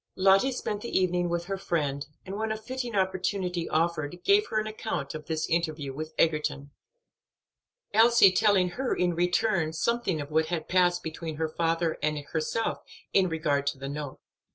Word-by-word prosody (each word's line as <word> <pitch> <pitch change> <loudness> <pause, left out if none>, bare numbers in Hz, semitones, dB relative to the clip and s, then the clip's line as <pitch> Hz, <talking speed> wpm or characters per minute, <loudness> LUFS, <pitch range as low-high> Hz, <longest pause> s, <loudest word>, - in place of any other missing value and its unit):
Lottie 195 +7 +4
spent 210 -4 -3
the 235 - -5
evening 180 -1 +1
with 170 0 -2
her 195 +1 -4
friend, 145 -7 -1 0.2
and 190 - -6
when 220 +1 -2
a 220 - -1
fitting 245 +1 -5
opportunity 185 -2 -1
offered 165 0 -1
gave 410 +1 +4
her 215 - 0
an 215 - -2
account 215 -10 -4
of 155 -1 -8
this 160 -1 -1
interview 155 -4 -1
with 155 +3 -6
Egerton, 150 -3 0 1.2
Elsie 225 -2 +7
telling 185 -1 +3
her 250 +7 -2
in 180 -1 +1
return 175 -1 +1
something 215 -2 0
of 145 +1 -6
what 160 +1 +2
had 170 -1 -3
passed 180 -1 +2
between 160 0 -5
her 160 +1 -1
father 165 0 0
and 155 0 0
herself 155 +9 -2 0.3
in 190 -2 +4
regard 150 -3 0
to 140 - 0
the 135 +1 -6
note. 145 -1 -6
175 Hz, 175 wpm, -28 LUFS, 155-195 Hz, 1.2 s, Elsie